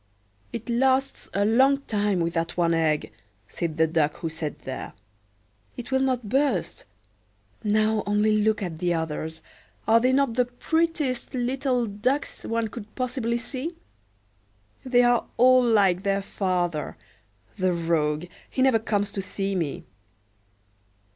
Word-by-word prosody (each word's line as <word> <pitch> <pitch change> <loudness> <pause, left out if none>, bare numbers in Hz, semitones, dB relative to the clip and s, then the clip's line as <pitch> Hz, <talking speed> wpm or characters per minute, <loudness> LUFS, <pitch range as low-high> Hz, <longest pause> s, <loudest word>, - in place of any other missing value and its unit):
"It 230 -1 -6
lasts 265 +3 +1
a 200 +1 +1
long 265 +5 +4
time 205 -7 0
with 170 0 -1
that 165 +1 -2
one 170 -1 +3
egg," 155 -2 +1 0.4
said 165 +3 -3
the 160 - +5
Duck 155 -2 +1
who 165 - -4
sat 160 -1 -4
there. 130 0 -6 0.8
"It 245 +2 -7
will 265 - +3
not 255 -4 0
burst. 275 +6 0 0.8
Now, 215 0 +2
only 210 +1 +2
look 215 0 +1
at 165 -4 -5
the 175 -1 +1
others; 160 0 -4 0.4
are 225 +1 +6
they 255 +2 +2
not 270 -2 +2
the 250 +1 +2
prettiest 295 0 -1
little 255 0 0
ducks 235 +7 -2
one 230 -1 -1
could 215 -1 -10
possibly 245 -2 -1
see? 265 +7 -4 1.1
They 245 -1 +4
are 240 -1 +3
all 255 +1 +6
like 200 -6 +3
their 195 0 0
father: 175 -6 -2 0.6
the 185 0 +2
rogue, 165 -2 0 0.2
he 260 - 0
never 260 -4 +4
comes 205 -2 -1
to 200 - -3
see 195 +1 -2
me." 165 -7 -3
215 Hz, 140 wpm, -25 LUFS, 175-250 Hz, 1.1 s, are